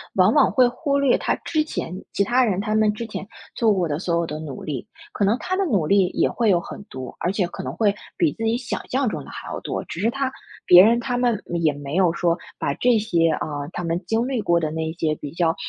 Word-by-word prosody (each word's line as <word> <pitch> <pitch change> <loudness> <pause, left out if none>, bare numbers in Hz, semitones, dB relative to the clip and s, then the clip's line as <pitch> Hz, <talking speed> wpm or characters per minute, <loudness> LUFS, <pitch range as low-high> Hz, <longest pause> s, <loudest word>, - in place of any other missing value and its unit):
往 190 +3 +5
往 - - +4
会 255 -2 +5
忽 280 +3 -1
略 275 -3 +3
他 - - 0
之 310 -1 +1
前 185 - -5
其 - - -1
他 245 +5 +3
人， 200 -6 +1
他 215 +2 -1
们 215 -1 +4
之 230 +2 -6
前 210 - -6 0.3
做 225 -3 +3
过 180 -3 0
的 145 - -2
所 170 0 -1
有 170 -1 0
的 150 0 -5
努 145 -5 -7
力。 140 -5 -4 0.3
可 - - -1
能 210 +5 +3
他 370 - -2
的 395 - +1
努 195 - +1
力 195 -2 +4
也 - - +1
会 230 -2 +1
有 180 -3 +4
很 195 - -9
多， 130 -1 -7
而 175 - +1
且 195 -3 0
可 - - -7
能 130 - -4
会 200 +4 +1 0.2
比 330 -4 +2
自 225 - -6
己 225 +1 +1
想 245 -1 -5
象 265 +1 +1
中 215 - -3
的 - - -13
还 - - -8
要 - - -4
多。 - - -4
只 170 - -6
是 225 +3 +2
他 270 +1 -1 0.4
别 180 0 +9
人 230 +3 +4
他 245 +1 -2
们 240 -4 +1
没 170 - -3
也 160 -2 +3
没 145 +1 -6
有 185 -2 +4
说 170 0 +1 0.2
把 140 - 0
这 240 +8 +3
些， 170 -6 +2
呃， 145 -1 -3
他 175 - -4
们 170 +2 -2
经 225 +5 0
历 260 -4 -1
过 170 -4 +2
的 155 -2 -1
那 160 +1 -3
些 160 -2 -1
比 145 -1 -8
较， 165 0 +1
195 Hz, 285 characters per minute, -23 LUFS, 165-235 Hz, 0.4 s, 别